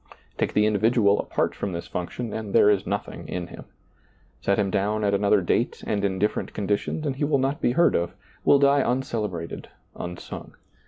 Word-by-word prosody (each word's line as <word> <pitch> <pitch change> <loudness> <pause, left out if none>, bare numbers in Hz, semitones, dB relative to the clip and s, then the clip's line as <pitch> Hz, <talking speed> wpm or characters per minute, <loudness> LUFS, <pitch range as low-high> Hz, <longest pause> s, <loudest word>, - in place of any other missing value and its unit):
Take - - 0
the 105 - +4
individual 110 0 +3
apart - - -1
from 100 - -4
this 85 - -4
function 95 +6 -5
and 110 -2 -5
there 105 - +7
is 100 -3 0
nothing 100 +2 -4
in 90 -1 -3
him. - - -11 0.8
Set 100 - +1
him 100 -2 +1
down 105 +2 0
at 100 -1 +2
another 100 0 +3
date 85 - 0
and 100 -1 -1
in 95 -2 0
different 105 +3 -1
conditions 105 +9 -1
and 135 -3 -2
he 145 - -2
will 145 -1 +3
not 135 +2 -1
be 120 - +2
heard 170 +4 +4
of 85 +1 -1
— - - -30
will 140 - +6
die 140 0 +4
uncelebrated, 110 -10 -2 0.3
unsung. 90 0 -7
105 Hz, 195 wpm, -25 LUFS, 95-120 Hz, 0.8 s, there